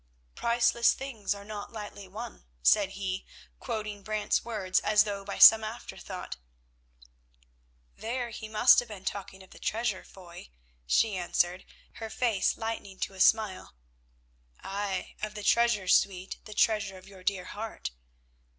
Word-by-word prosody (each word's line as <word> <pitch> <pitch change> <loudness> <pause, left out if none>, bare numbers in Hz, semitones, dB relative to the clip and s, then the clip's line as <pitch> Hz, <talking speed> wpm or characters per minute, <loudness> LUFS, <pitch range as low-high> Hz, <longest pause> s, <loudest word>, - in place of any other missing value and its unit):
"Priceless 235 0 +3
things 230 -7 -3
are 200 0 -10
not 210 -1 -7
lightly 205 -3 -8
won," 220 - -8 0.2
said 195 - +4
he, 195 -1 -3 0.4
quoting 215 -3 -4
Brant's 215 0 0
words 205 -5 0
as 210 0 +4
though 200 -2 -4
by - - -5
some 220 0 +10
afterthought. 220 - -7 1.6
"There 240 +1 -3
he 220 0 -7
must 220 +3 +6
have 245 - -4
been 200 -3 -10
talking 190 -1 -5
of 190 - -19
the - - -14
treasure, 220 -3 -1
Foy," 175 - -13 0.4
she 210 - +3
answered, 175 0 0 0.3
her 225 -1 -6
face 225 -5 +1
lightening 225 -4 -5
to - - -2
a 190 - -12
smile. 210 - +2 0.9
"Ay, 195 -1 -3
of 215 0 -4
the 210 - -6
treasure, 235 -3 +3
sweet, 185 0 +2
the 215 - -9
treasure 210 -4 +2
of 185 - -15
your 190 -2 -14
dear 185 -1 -1
heart." 220 - -6
210 Hz, 145 wpm, -29 LUFS, 190-225 Hz, 1.6 s, some